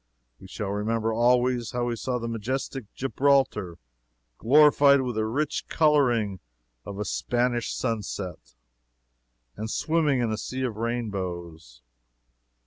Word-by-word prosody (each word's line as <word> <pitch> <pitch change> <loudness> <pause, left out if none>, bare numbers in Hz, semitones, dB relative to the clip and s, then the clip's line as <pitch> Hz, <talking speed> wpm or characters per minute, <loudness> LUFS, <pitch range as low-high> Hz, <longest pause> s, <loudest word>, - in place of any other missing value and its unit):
We 95 - -12
shall 100 +2 -5
remember, 110 +2 -1
always, 120 +1 +2
how 120 0 -1
we 120 -1 -1
saw 125 +3 -2
majestic 115 +1 -4
Gibraltar 135 -9 +1 0.6
glorified 140 +1 +6
with 125 -2 -2
the 110 0 -1
rich 145 +6 -2
coloring 120 - +2 0.5
of 100 - -7
a 105 - -3
Spanish 120 +3 -1
sunset 100 - -4 1.0
and 110 +1 -5
swimming 155 -1 +1
in 120 -2 0
a 110 - -2
sea 130 +3 -4
of 120 -5 -3
rainbows. 90 - -5
115 Hz, 120 wpm, -26 LUFS, 105-130 Hz, 1.0 s, glorified